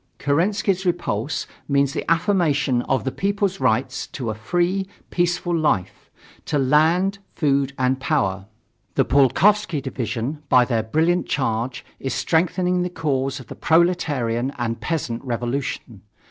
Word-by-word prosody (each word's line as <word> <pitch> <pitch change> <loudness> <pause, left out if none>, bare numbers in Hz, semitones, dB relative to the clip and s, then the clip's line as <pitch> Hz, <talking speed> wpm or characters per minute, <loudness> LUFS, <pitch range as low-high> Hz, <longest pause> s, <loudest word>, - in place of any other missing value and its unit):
Kerensky's 190 +6 +1
repulse 165 - -1 0.2
means 140 -1 +2
the - - -2
affirmation 165 - +2
of 135 - +1
the 135 - -2
people's 200 +1 -1
rights 130 +4 0
to 120 -5 -4
a - - -3
free, 175 - 0 0.2
peaceful 175 0 0
life, 150 - -1 0.4
to 150 - 0
land, 160 +8 +3 0.2
food 140 -3 +1
and 130 0 +1
power. 95 -6 0 0.5
The - - +3
Pulkovsky 170 - +3
division, 130 +1 -4
by 125 -1 +6
their 115 -3 0
brilliant 160 +11 +1
charge, 125 -1 -2
is 135 - -3
strengthening 180 +2 +1
the 180 - -1
cause 140 -5 -1
of 130 - -10
the - - -9
proletarian 145 -7 +1
and 115 -1 -3
peasant 135 -9 -2
revolution. 120 -3 -3
140 Hz, 135 wpm, -22 LUFS, 125-175 Hz, 0.5 s, by